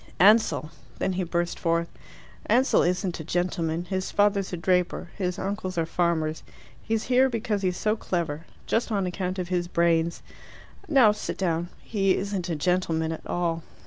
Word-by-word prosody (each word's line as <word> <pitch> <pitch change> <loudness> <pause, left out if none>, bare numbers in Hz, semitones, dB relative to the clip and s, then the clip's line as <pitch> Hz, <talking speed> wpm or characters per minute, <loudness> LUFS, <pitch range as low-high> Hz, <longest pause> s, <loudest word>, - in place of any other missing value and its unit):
"Ansell" 205 -5 +4 0.3
Then 190 - 0
he 185 +1 -1
burst 175 0 -2
forth. 170 0 +1 0.6
"Ansell 250 +5 +4
isn't 180 0 0
a - - -5
gentleman. 170 0 -1
His 190 0 -2
father's 205 -1 +2
a 180 - -3
draper. 180 0 0
His 180 -3 -2
uncles 190 -2 -3
are 165 - +2
farmers. 160 -2 0 0.4
He's 220 -1 -1
here 260 +1 +4
because 225 -3 -1
he's 180 -2 0
so 215 0 +1
clever 170 -7 -3 0.2
just 230 +1 0
on 200 -3 +1
account 185 +1 -3
of 180 -1 -3
his 175 -1 0
brains. 170 -1 +1 0.6
Now, 265 -8 +6
sit 210 - -4
down. 175 -2 -1
He 195 -3 +1
isn't 195 -2 -3
a 165 - 0
gentleman 165 -1 0
at 160 - -7
all." 170 -2 -1
180 Hz, 165 wpm, -26 LUFS, 170-200 Hz, 0.6 s, Now